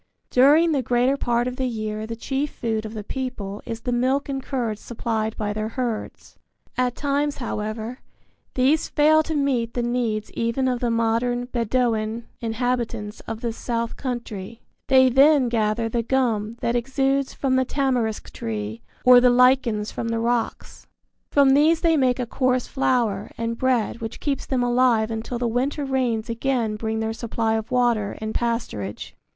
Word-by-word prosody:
During 295 +6 +5
the 280 -3 +1
greater 245 +2 +2
part 240 -2 0
of 250 0 -4
the 260 - 0
year 215 -2 -4
the 230 - -4
chief 270 +5 -2
food 220 -4 -3
of 220 - -9
the 210 - -5
people 210 -5 -5
is 230 -1 -5
the 245 - -2
milk 260 +3 +1
and 270 -1 -2
curds 240 -6 -3
supplied 220 -2 -3
by 210 -1 -2
their 215 +1 -3
herds. 235 -2 -5 0.4
At 250 -1 0
times, 285 +1 -1
however, 220 0 -4 0.6
these 270 +5 +2
fail 310 +1 +5
to 315 0 -3
meet 255 -5 0
the 245 - 0
needs 235 -3 -1
even 230 +3 -1
of 250 -1 0
the 240 - 0
modern 230 +2 +1
Bedouin 230 -2 -1
inhabitants 230 -2 -2
of 225 0 -5
this 235 -2 -2
South 235 -1 -2
Country. 230 -4 -6 0.2
They 260 -1 +6
then 270 0 +5
gather 225 0 0
the 235 +1 -1
gum 230 -3 0
that 235 - 0
exudes 270 +2 0
from 265 -2 0
the 260 - +3
tamarisk 255 -5 -1
tree 110 0 -4 0.2
or 250 -1 +9
the 250 - +6
lichens 245 -4 +3
from 230 - -4
the 230 0 -1
rocks. 235 0 -2 0.4
From 280 -2 +5
these 310 +4 +4
they 330 -2 +3
make 255 -4 +2
a 250 - -2
coarse 255 +1 0
flour 235 -7 0
and 230 0 -2
bread 240 -2 0
which 225 0 -5
keeps 280 -2 -2
them 255 -2 0
alive 240 -2 +3
until 225 +2 -4
the 240 0 -1
winter 265 +5 -1
rains 245 -4 0
again 230 -2 -1
bring 220 +1 -2
their 220 0 -1
supply 225 -1 -1
of 220 0 -2
water 240 -5 +1
and 220 0 -4
pasturage. 225 - -3
240 Hz, 170 wpm, -23 LUFS, 225-260 Hz, 0.6 s, or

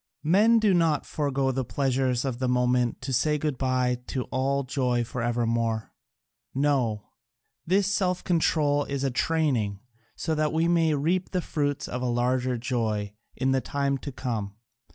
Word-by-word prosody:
Men 205 +9 +5
do 215 -3 +3
not 165 -4 +2
forego 140 -3 0
the 130 0 -1
pleasures 130 -1 0
of 125 -3 -3
the 130 - 0
moment 125 -1 +1
to 135 +1 -3
say 150 +5 +2
good 150 -3 -2
bye 125 -1 +1
to 130 - -2
all 140 +2 0
joy 125 -2 0
for 120 +1 -5
evermore 115 -1 -1 0.6
no, 130 -7 +1 0.6
this 195 +3 +3
self 185 -2 0
control 150 -4 +2
is 140 -1 -3
a 135 - +1
training, 125 -9 0 0.4
so 160 - -2
that 155 -1 0
we 165 +1 +2
may 165 -3 +3
reap 175 +6 0
the 185 - -1
fruits 145 -3 -2
of 125 - -4
a 125 - -1
larger 125 +1 0
joy 110 -4 -2 0.2
in 130 0 0
the 135 0 +2
time 140 0 -1
to 140 - -6
come. 110 -6 -4
135 Hz, 165 wpm, -26 LUFS, 125-150 Hz, 0.6 s, Men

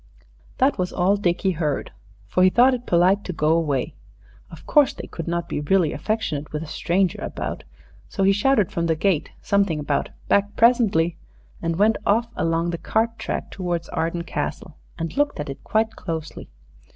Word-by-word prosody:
That 265 -5 +2
was 180 0 -1
all 190 +3 +2
Dickie 190 -1 +1
heard, 155 -5 -2 0.4
for 185 - +1
he 185 - +7
thought 245 +6 +5
it 245 -1 -4
polite 185 +4 +3
to - - -3
go 155 -1 +1
away. 150 -6 0 0.6
Of - - -13
course, 295 -3 +4
they - - -7
could 165 - -7
not 170 0 -2
be - - -3
really 165 +1 +2
affectionate 170 -10 -2
with 150 +1 -3
a - - -7
stranger 175 +3 0
about. - - -5 0.4
So 195 - -1
he 195 - +5
shouted 210 0 +2
from 170 -5 -1
the 160 - +2
gate 165 -1 0
something 200 -6 +1
about 145 -1 -1 0.2
"back 205 +1 +2
presently," 215 -9 +3 0.4
and 165 0 -1
went 210 +4 +3
off 230 +3 +1
along 165 +1 0
the 170 - -4
cart 230 +1 0
track - - -4
towards 175 -3 -3
Arden 165 +1 -2
Castle 160 -1 -4 0.2
and 165 -1 -4
looked 290 - 0
at 150 -1 -3
it 135 - -10
quite 220 +1 +1
closely. 160 -1 -6
180 Hz, 180 wpm, -23 LUFS, 165-210 Hz, 0.6 s, he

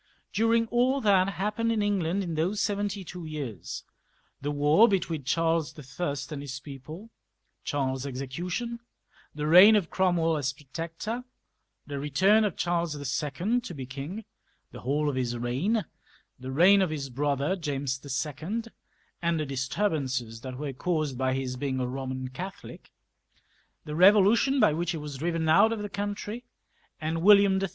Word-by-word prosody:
During 230 +2 +3
all 250 +3 +2
that 195 -3 +4
happened 210 +5 -1
in 220 -2 +1
England 195 -2 0
in 170 -3 -4
those 175 +7 0
seventy 205 -1 -1
two 180 0 -8
years 140 - -6 0.3
— - - -30
^the 145 - -1
war 150 +9 +5
between 165 - -1
Charles 165 +1 0 0.2
L 145 -5 0 0.2
and 145 -2 -4
his 140 -1 -6
people, 155 - -10 0.5
Charles's 135 -2 -2
execution^ 175 - -4 0.6
the 150 0 -3
reign 185 +7 +8
of 195 -6 0
Cromwell 170 -4 +2
as 130 -3 -1
Protector, 165 - -6 0.6
the 140 -1 -5
return 190 +10 +3
of 200 - -2
Charles 170 -2 0
II. 150 - -1
to 235 - -7
be 135 -2 -6
king, 145 - -7 0.5
the - - -9
whole 145 +4 0
of 145 - 0
his 120 -2 -1
reign, 140 - 0 0.5
the 130 +1 -6
reign 185 +8 +6
of 185 - +2
his 140 -4 -4
brother 145 +5 0
James 140 -6 -3 0.2
IL, 160 - -4 0.6
and 170 -1 +1
the 155 - -1
disturbances 135 - -2
that 130 0 -7
were 145 -1 -4
caused 155 -1 -1
by 130 +1 0
his 130 -1 -3
being 130 0 -2
a - - 0
Boman 130 0 -5
Catholic, 185 +6 -8 0.9
the 150 - -5
Revolution 205 - +5
by 155 - +5
which 170 +2 -2
he - - -3
was 150 -2 -6
driven 165 0 -1
out 160 +8 +6
of 220 -2 -3
the 205 - -4
country 205 +3 -4 0.6
and 160 +1 -2
William 200 0 +6
III. 195 - -1
160 Hz, 160 wpm, -28 LUFS, 140-200 Hz, 0.9 s, reign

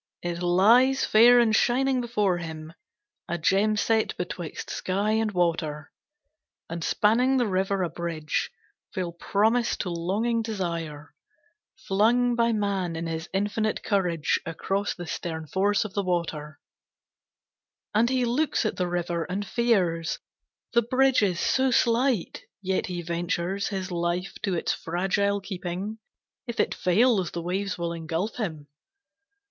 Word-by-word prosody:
It 175 0 -3
lies 225 +10 +4
fair 240 +3 +7
and 225 -2 +4
shining 255 +2 +2
before 210 -7 0
him, 160 -1 -7 0.5
a 175 - -2
gem 200 +6 +2
set 220 +1 +1
betwixt 175 -2 -5
sky 200 +3 -1
and 220 0 +1
water, 165 -4 -1 0.8
And 165 0 -5
spanning 245 +9 +3
the 245 - +2
river 190 -1 0
a 175 - -1
bridge, 165 -3 -2 0.4
frail 180 -2 -3
promise 220 +7 +1
to 180 - -3
longing 205 +8 0
desire, 170 -8 -4 0.7
Flung 235 +5 +3
by 235 0 +2
man 200 -5 -1
in 165 +1 -3
his 165 0 -4
infinite 205 +2 -1
courage, 180 -6 +1
across 195 +5 -2
the 175 - -7
stern 160 -1 -4
force 200 +6 +1
of 205 - -7
the 200 - 0
water; 165 -4 -3 1.3
And 225 +3 +3
he 255 -1 +1
looks 255 +2 0
at 215 - -1
the 180 - 0
river 175 -1 -2
and 195 +3 -3
fears, 190 -8 +1 0.6
the 235 - +5
bridge 260 +2 +3
is 185 -4 +1
so 265 +6 +2
slight, 240 -3 +1 0.2
yet 190 -1 -1
he 175 -1 -4
ventures 175 +3 -2
His 190 -3 -4
life 175 +2 -1
to 190 -3 -1
its 165 - 0
fragile 195 +4 0
keeping, 190 +3 -5 0.5
if 235 - -5
it - - +2
fails 195 0 +2
the 170 - -5
waves 190 +3 -2
will 170 -1 -2
engulf 165 +5 -3
him. 160 -10 -4
190 Hz, 140 wpm, -26 LUFS, 170-220 Hz, 1.3 s, fair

